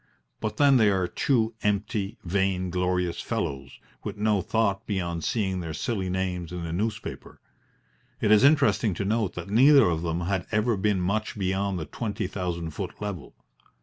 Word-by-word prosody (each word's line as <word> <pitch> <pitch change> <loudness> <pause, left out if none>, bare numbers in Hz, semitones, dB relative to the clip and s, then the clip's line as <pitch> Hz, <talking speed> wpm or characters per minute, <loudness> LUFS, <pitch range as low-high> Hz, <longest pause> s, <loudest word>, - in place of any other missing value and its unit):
But 110 - -3
then 140 -2 +6
they 110 -3 +5
are 95 -2 +1
two 115 +4 +1
empty, 105 +1 -1
vainglorious 90 -1 0
fellows 70 -1 -4 0.2
with - - -5
no 105 -1 +2
thought 110 0 0
beyond 85 -5 -2
seeing 95 -5 0
their 80 -3 -5
silly 95 +2 -2
names 90 -2 -2
in 90 -1 -5
the 85 -1 -4
newspaper. 105 +3 -4 0.8
It 105 - +2
is 105 +3 +6
interesting 110 - +4
to 100 - -3
note 110 -3 0
that 90 +3 -6
neither 135 +5 +7
of 80 -2 0
them 85 0 -2
had 90 0 -1
ever 110 +2 +2
been 100 -1 +1
much 105 +4 -1
beyond 95 0 -1
the 80 - -4
twenty 105 -5 -4
thousand 90 -3 -3
foot - - -6
level. 100 -6 -6
95 Hz, 165 wpm, -26 LUFS, 90-110 Hz, 0.8 s, neither